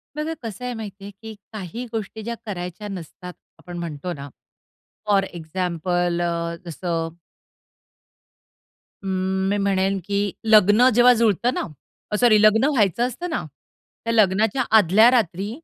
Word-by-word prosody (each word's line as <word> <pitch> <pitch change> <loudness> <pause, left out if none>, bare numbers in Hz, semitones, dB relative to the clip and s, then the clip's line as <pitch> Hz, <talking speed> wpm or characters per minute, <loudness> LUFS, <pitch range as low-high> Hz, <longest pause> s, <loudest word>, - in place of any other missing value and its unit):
बघा 305 +2 -3
कसं 225 +2 -6
आहे 250 - -3
माहिती 205 -3 -8
आहे, 200 - -8
की 220 +2 -11 0.2
काही 215 +4 -6
गोष्टी 220 -1 -5
ज्या 235 +1 -4
करायच्या 180 +1 -6
नसतात, 180 0 -9 0.3
आपण 175 -1 -9
म्हणतो 170 0 -5
ना 140 -1 -9 0.8
फॉर 200 -2 +3
एक्झाम्पल 175 0 -2
अ, 170 0 -2
जसं 165 -1 -3 1.9
अं, 190 0 -1
मी 205 - +1
म्हणेन, 195 -1 +1
की 200 -1 -1
लग्न 215 +3 +6
जेव्हा 245 +1 +7
जुळतं 230 +3 +2
ना, - - -2 0.5
अ, - - 0
सॉरी 215 -4 +5
लग्न 215 +3 +5
व्हायचं 230 +1 +2
असतं 345 +9 -6
ना, 310 - -2 0.6
त्या 230 - 0
लग्नाच्या 215 +3 +3
आदल्या 215 +4 +6
रात्री 200 -4 0
200 Hz, 140 wpm, -22 LUFS, 180-220 Hz, 1.9 s, जेव्हा